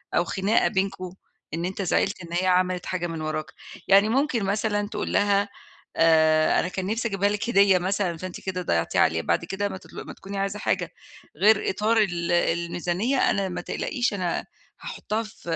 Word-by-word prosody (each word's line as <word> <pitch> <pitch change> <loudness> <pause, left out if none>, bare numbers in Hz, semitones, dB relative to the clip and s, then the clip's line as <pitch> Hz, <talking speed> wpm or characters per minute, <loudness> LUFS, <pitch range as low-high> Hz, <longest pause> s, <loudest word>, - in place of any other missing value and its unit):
أو 175 - +3
خناقة 195 +5 +1
بينكم، 190 -2 -2 0.4
إن 165 +2 -2
أنت 190 +2 -4
زعِلت 185 0 0
إن 170 - -10
هي 180 +2 +1
عملت 180 0 +1
حاجة 175 -1 -2
من 165 -2 -5
وراك، 155 0 -3 0.4
يعني 200 +2 +6
ممكن 260 -2 +1
مثلًا 205 +1 0
تقُول - - -4
لها 200 0 +2 0.5
آآ، 160 -1 +4
أنا - - 0
كان 185 +1 -4
نفسي 225 +4 -1
أجيبها 200 -1 +1
لِك 210 +3 -2
هدية 200 -4 +5
مثلًا، 185 -1 -1
فأنتِ 185 +1 -7
كده 185 -1 -3
ضيّعتيها 85 - +1
عليَّ، 80 0 +2
بعد 170 - 0
كده 195 +3 -3
امّا 195 - -6
تط - - -17
أمّا - - -8
تكوني 195 +1 -8
عايزة 195 +1 -2
حاجة - - -1 0.5
غير 210 +1 +4
إطار 215 +4 +1
ال 175 -6 +1
الميزانية، 175 +7 0
أنا 195 -2 -1
ما 180 - -4
تقلقيش 250 -7 -2
أنا 180 -4 -2 0.4
هاحطّها 220 +2 -3
في 215 0 -14
190 Hz, 180 wpm, -25 LUFS, 175-205 Hz, 0.5 s, يعني